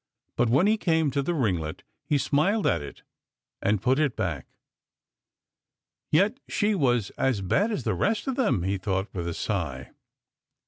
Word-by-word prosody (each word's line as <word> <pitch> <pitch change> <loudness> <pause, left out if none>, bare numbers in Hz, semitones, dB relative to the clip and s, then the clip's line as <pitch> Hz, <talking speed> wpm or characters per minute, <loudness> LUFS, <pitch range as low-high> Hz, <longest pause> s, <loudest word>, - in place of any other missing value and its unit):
But 120 -1 +2
when 135 +10 +4
he 215 +2 +3
came 160 -7 +1
to 140 - 0
the 170 +5 -1
ringlet 90 - -1 0.2
he 150 - +1
smiled 170 - +1
at - - +2
it 70 - -10 0.6
and 100 -1 +1
put 130 +4 +3
it 150 -5 +1
back. - - -3 0.8
" - - -64
Yet 205 - +3
she 210 0 +1
was 125 - +1
as 130 -7 +1
bad 200 - +1
as 210 - -2
the - - 0
rest 215 0 0
of 265 - -2
them," 210 - +1
he 95 +1 -1
thought 95 +1 -2
with 85 -2 -3
a 85 - -3
sigh. 75 -11 -3
135 Hz, 175 wpm, -26 LUFS, -, 0.8 s, when